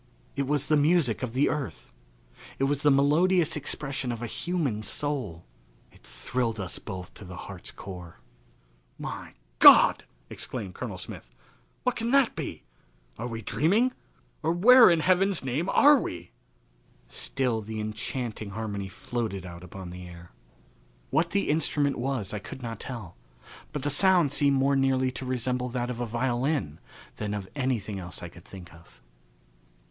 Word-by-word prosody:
It 140 -1 -1
was 145 -1 +1
the 150 +2 +3
music 145 -5 +3
of 125 -3 -3
the 135 +3 +3
earth. 130 - -4 0.6
It - - -1
was 140 +1 +1
the 150 - +4
melodious 155 +5 +3
expression 135 -3 -2
of 120 0 -5
a - - -1
human 140 -4 -2
soul. 110 - -3 0.5
It - - -21
thrilled 115 -3 -3
us 95 -2 -4
both 95 -4 -7
to - - -12
the 90 -1 -9
heart's 95 +1 -8
core. 90 -3 -9 0.8
"My - - -7 0.2
God!" - - +8 0.2
exclaimed 95 +8 -6
Colonel - - -5
Smith. - - -8 0.5
"What - - +1
can 230 +1 -2
that 275 -2 +4
be? - - -5 0.6
Are 120 - -3
we 115 -2 -6
dreaming, 205 - +2 0.5
or 160 +1 +1
where 235 +7 +8
in 170 -2 +3
heaven's 185 0 +2
name 145 +9 -1
are 290 -1 +6
we?" 90 0 -6 0.8
Still 120 - -1
the 110 +1 -6
enchanting 110 0 -4
harmony 100 -1 -4
floated 100 0 -4
out 85 0 -9
upon 90 0 -9
the 90 0 -9
air. 85 0 -12 0.8
What 170 +2 +2
the 200 +3 0
instrument 145 -2 +1
was 120 -6 -2
I 105 - -2
could 125 +5 -9
not 115 -2 -5
tell; 115 -9 -7 0.5
but 150 -3 -4
the 145 - 0
sound 175 -1 +4
seemed 140 -1 +3
more 135 +1 +3
nearly 130 -1 +2
to 130 0 -4
resemble 125 0 -1
that 125 0 -2
of 120 - -6
a 120 - -2
violin 120 - -1 0.4
than 105 -1 -3
of 100 -2 -5
anything 115 -7 -1
else 90 -1 -6
I 90 - -6
could 85 0 -16
think 90 -4 -11
of. 80 -6 -19
125 Hz, 160 wpm, -27 LUFS, 100-145 Hz, 0.8 s, God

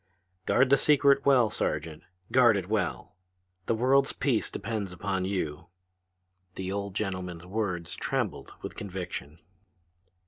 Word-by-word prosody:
"Guard 130 +1 +4
the 140 - +6
secret 140 -1 +4
well, 125 -6 +5
Sergeant! 80 -2 -2 0.3
Guard 120 -5 +6
it 95 -2 -4
well! 100 -4 -2 0.5
The 115 - +2
world's 135 +4 +3
peace 130 -5 0
depends 105 -5 -4
upon 95 0 -2
you!" 85 -6 -3 0.9
The 95 0 -4
old 100 -1 -4
gentleman's 90 -4 -3
words 95 -4 -2
trembled - - -2
with - - -6
conviction. 90 -6 -6
100 Hz, 125 wpm, -28 LUFS, 90-125 Hz, 0.9 s, the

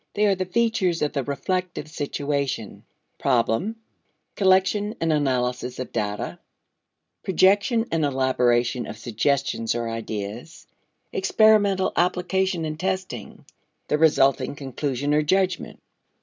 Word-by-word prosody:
They 210 - +3
are 200 - +4
the 185 0 -2
features 190 -5 +1
of 150 - -1
the 140 -3 -1
reflective 180 +6 -3
situation: 140 -6 -3 0.3
Problem, 130 - +1 0.6
collection 195 +2 +2
and 165 -1 +1
analysis 125 -3 -1
of 130 - -5
data, 105 -2 -3 0.8
projection 200 +6 +3
and 165 -1 +1
elaboration 125 -3 +1
of 110 - -7
suggestions 115 0 -1
or 120 -1 -2
ideas, 115 +5 -6 0.5
experimental 200 -1 +3
application 180 0 0
and 155 0 -5
testing; 185 - -4 0.4
the 150 - +1
resulting 140 -4 +3
conclusion 140 0 -2
or 150 - +4
judgment. 185 +3 0
150 Hz, 110 wpm, -24 LUFS, 125-190 Hz, 0.8 s, are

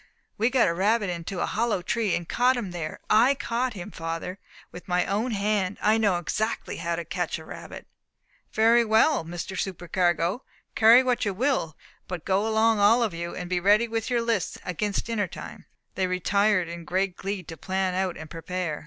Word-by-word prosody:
"We 225 +3 +2
got 255 -1 +3
a 170 - +1
rabbit 200 +2 +1
into 175 +2 -4
a - - +2
hollow 220 -5 -1
tree, 215 +1 0
and 175 - -4
caught 250 +5 +2
him 205 -7 -4
there. 165 -3 -5
I 240 +6 +5
caught 245 -1 -2
him, 190 +2 -7
father, 165 +3 -5 0.3
with 175 - -11
my 180 -1 +1
own 210 +6 -1
hand; 205 -3 0
I 215 +1 +3
know 200 -5 +2
exactly 215 +6 -2
how 170 0 -2
to 170 0 -5
catch 175 0 -2
a 160 - -11
rabbit." - - -9 0.7
"Very 230 +2 +4
well, 225 - +3
Mr. 175 +3 -6
Supercargo, 175 +1 0 0.3
carry 230 +3 +7
what 250 -2 0
you 200 -3 -1
will. 235 - 0 0.3
But 180 -3 -6
go 195 +3 +1
along 220 0 +3
all 225 +4 +5
of 215 -6 -1
you, 170 +1 -5
and 180 - -5
be 180 0 0
ready 205 +5 +4
with 225 0 -3
your 240 -2 +1
lists 230 -6 -1
against 200 +3 -2
dinner 215 -4 -1
time." - - -10 0.3
They 185 - 0
retired 185 +1 +2
in 170 0 -7
great 185 +2 -1
glee 195 0 -4
to 165 - -9
plan 190 +3 -1
out 185 -1 -1
and 160 - -8
prepare. 165 -1 -4
195 Hz, 195 wpm, -26 LUFS, 175-225 Hz, 0.7 s, carry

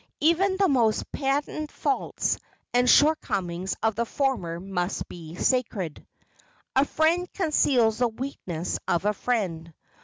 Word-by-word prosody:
Even 360 +5 +3
the 390 -1 +4
most 235 -7 +1
patent 290 +2 -1
faults - - -1 0.3
and 245 0 +4
shortcomings 190 - +2
of 220 0 +3
the 230 +3 0
former 225 -14 -1
must 180 -1 -3
be 165 -1 -9
sacred—"A 230 - -2
friend 335 +4 +1
conceals 255 - +2
the 245 - +4
weaknesses 220 -9 -4
of 175 +3 +1
a 210 - +3
friend." 185 -8 -2
240 Hz, 120 wpm, -26 LUFS, 185-290 Hz, 0.3 s, the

